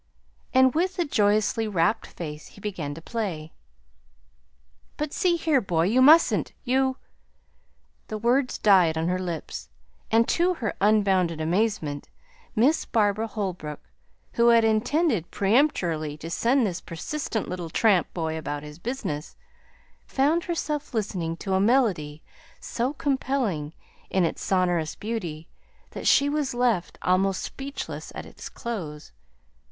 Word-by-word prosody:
And 260 -1 +5
with 360 +4 0
a 350 - +1
joyously 215 -2 +2
rapt 190 +1 +1
face 150 -3 -7
he - - -16
began 180 -9 -4
to 165 - -11
play. 175 -10 -4 1.4
"But, 300 -1 -3
see 355 -2 +2
here, 315 -5 +2
boy, 170 -4 +1
you 225 +9 +3
mustn't! 315 +5 +5
You 260 +1 +1 0.5
" - - -41
The 215 - -4
words 250 +4 +1
died 180 -6 +4
on 165 +2 0
her 180 0 0
lips; 170 - -5 0.4
and, 230 +1 +4
to 355 +1 +2
her 220 -9 -3
unbounded 195 -5 +3
amazement, 165 -4 -1 0.5
Miss 260 +8 +3
Barbara 215 0 +1
Holbrook, 180 -9 -5 0.4
who 235 0 +3
had 230 -1 +6
intended 225 - +1
peremptorily 180 - +1
to 165 +2 -8
send 240 +7 +2
this 185 -3 -3
persistent 220 - -4
little 180 -2 -5
tramp 195 +1 +2
boy 160 -2 -3
about 145 -1 -4
his 150 +1 -10
business, 170 - -4 0.7
found 300 +6 +1
herself 300 -6 -3
listening 180 -6 -2
to 195 +1 -3
a 190 - +3
melody 195 - +1 0.4
so 245 +3 -2
compelling 260 - -1 0.4
in 190 -2 +2
its - - -3
sonorous 175 -4 +1
beauty 180 -8 -5 0.4
that - - -4
she 280 - +5
was 285 -3 -1
left 240 -8 0
almost 190 +1 +2
speechless 275 +1 -6
at - - -6
its - - -10
close. 165 - -6
210 Hz, 135 wpm, -25 LUFS, 165-255 Hz, 1.4 s, had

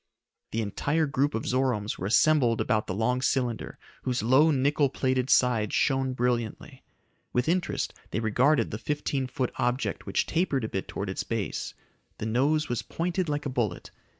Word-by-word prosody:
The 115 0 -1
entire 145 +10 0
group 140 -1 0
of 110 - -3
Zoromes 125 -5 0
were 95 - -2
assembled 120 0 +4
about 110 -3 +1
the 95 - -3
long 125 +4 +1
cylinder, 125 -3 -1 0.2
whose 125 -2 -1
low 130 +7 +5
nickel 140 0 +2
plated 130 -1 0
sides 115 -5 +3
shone 135 -1 +1
brilliantly. 120 -3 -2 0.5
With 125 +2 +1
interest 175 +1 0 0.2
they 105 - -2
regarded 125 +7 +2
the - - -4
fifteen 145 -3 -2
foot 130 0 -2
object 125 +1 -1
which - - +1
tapered 160 -7 0
a 110 - -2
bit 95 - -3
towards 100 -1 -4
its - - -3
base. 115 -4 -3 0.4
The - - -4
nose 140 +7 +1
was 120 -2 -1
pointed 175 0 -2
like 145 0 -2
a - - -1
bullet. 115 -8 -2
130 Hz, 170 wpm, -27 LUFS, 115-145 Hz, 0.5 s, low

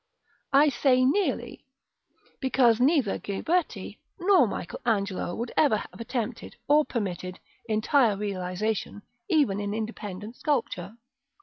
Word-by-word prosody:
(I 285 +2 +6
say 255 -1 +3
nearly, 385 +9 0 0.8
because 250 -4 +3
neither 270 -6 +2
Ghiberti 320 - -2 0.2
nor 360 - +5
Michael 185 - -5
Angelo 200 -6 -1
would 235 +1 -4
ever 280 -8 +4
have - - -9
attempted, 230 0 -4
or 300 +1 +5
permitted, 185 -7 -4 0.3
entire 220 0 +3
realisation, 200 +1 -3 0.3
even 280 - +2
in 205 0 -3
independent 215 0 -6
sculpture.) 225 - -2
225 Hz, 110 wpm, -27 LUFS, 205-275 Hz, 0.8 s, I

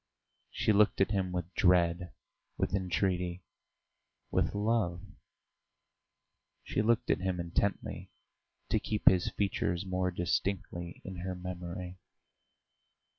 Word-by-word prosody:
She 110 - +1
looked 105 0 +4
at 95 - +3
him 95 -3 0
with 90 0 -4
dread, 90 -1 +3 0.5
with - - -1
entreaty, 90 -2 0 0.9
with - - +1
love; 100 -4 +1 1.6
she - - 0
looked 115 +3 +2
at - - +2
him 95 -1 -1
intently, 85 +3 -1 0.6
to - - +2
keep 105 - -3
his 90 -1 +6
features 95 -2 -1
more 90 0 0
distinctly 85 -1 -2
in 95 -1 -6
her 90 +1 -4
memory. 90 0 -6
90 Hz, 110 wpm, -32 LUFS, 90-100 Hz, 1.6 s, his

